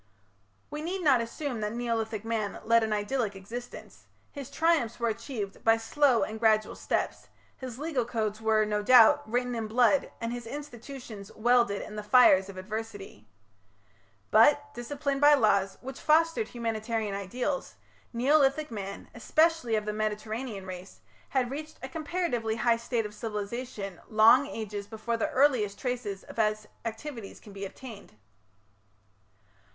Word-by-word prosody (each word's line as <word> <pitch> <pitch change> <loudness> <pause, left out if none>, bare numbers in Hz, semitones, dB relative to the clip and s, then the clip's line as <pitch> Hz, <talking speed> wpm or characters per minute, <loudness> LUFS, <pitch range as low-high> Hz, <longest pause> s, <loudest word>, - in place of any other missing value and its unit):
We 300 0 -4
need 360 +3 -3
not 270 -6 +5
assume 235 +1 -4
that 210 +1 -2
Neolithic 225 -3 -2
man 220 -3 -2
led 230 +1 +4
an 220 -1 -1
idyllic 210 0 -1
existence; 230 +6 -9 0.2
his 280 -4 -8
triumphs 320 -9 +1
were 235 -1 +1
achieved 215 -2 -5
by 225 0 +5
slow 250 +2 +2
and 220 0 -5
gradual 215 -1 +2
steps; - - -2 0.3
his 255 -3 -8
legal 290 -3 -1
codes 220 -2 -3
were, 220 -1 +3
no 210 0 -1
doubt, 230 +1 +7
written 245 +1 0
in 225 -2 -3
blood 245 +5 +3
and 230 0 -3
his 240 -1 -6
institutions 245 -6 -8
welded 235 -2 +2
in 215 - -9
the - - -3
fires 210 -4 +5
of 195 - -9
adversity. 205 - -7 1.0
But, 290 +6 +5
disciplined 275 +3 -3
by 295 0 +8
laws, 200 -6 +2
which 265 0 -8
fostered 330 +7 +3
humanitarian 225 -2 -3
ideals, 245 +8 -3 0.4
Neolithic 275 +4 +2
man, 200 -3 -6
especially 310 0 +2
of 215 -1 -1
the 210 - -2
Mediterranean 215 0 -3
race, 185 0 -9 0.3
had 255 -2 0
reached 305 +2 -7
a - - -3
comparatively 290 -7 -2
high 230 +1 +2
state 235 -1 -2
of 210 - -7
civilization 210 -2 -5
long 220 +5 +6
ages 210 -5 -5
before 225 +2 -3
the - - -1
earliest 255 -7 +2
traces 235 -7 -4
of - - -13
his 215 -1 0 0.2
activities 230 -1 -6
can 205 - -14
be 200 0 -5
obtained. 215 0 -10
230 Hz, 145 wpm, -28 LUFS, 215-260 Hz, 1.0 s, by